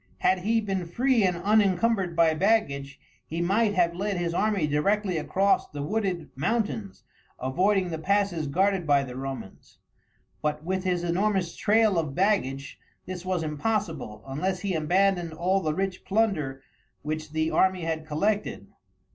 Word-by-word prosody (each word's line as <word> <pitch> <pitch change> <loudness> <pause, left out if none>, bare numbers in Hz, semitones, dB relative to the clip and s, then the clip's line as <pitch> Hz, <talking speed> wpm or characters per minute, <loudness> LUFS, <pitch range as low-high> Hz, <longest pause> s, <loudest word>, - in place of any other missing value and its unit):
Had 185 - +2
he 225 +5 +1
been 190 -4 -2
free 245 +5 +2
and 180 -2 +2
unencumbered 195 -1 +2
by 165 -1 +4
baggage 150 -7 0 0.3
he 165 - -4
might 205 +4 +2
have 170 -2 +3
led 195 +2 -2
his 170 -1 -1
army 200 -2 +1
directly 180 +5 +1
across 195 +6 +1
the 145 -1 -5
wooded 190 0 -2
mountains, 205 - -2 0.3
avoiding 185 +8 +1
the 160 - -3
passes 195 -2 0
guarded 185 +3 +1
by 140 -1 +4
the 125 -2 -8
Romans, 135 -6 -7 0.6
but 150 0 -2
with 190 +2 -2
his 180 -2 0
enormous 185 0 0
trail 215 -3 +3
of 150 -4 -3
baggage 140 -9 0 0.3
this 180 -1 -6
was 185 -3 -1
impossible 160 - -2
unless 180 +7 -2
he 200 -2 -1
abandoned 175 +1 +1
all 185 +4 +1
the 155 -3 -1
rich 190 0 -2
plunder 190 -11 0 0.4
which 155 +1 -4
the 160 +1 0
army 185 -1 +2
had 160 -1 -3
collected. 200 +8 -1
180 Hz, 150 wpm, -26 LUFS, 155-200 Hz, 0.6 s, by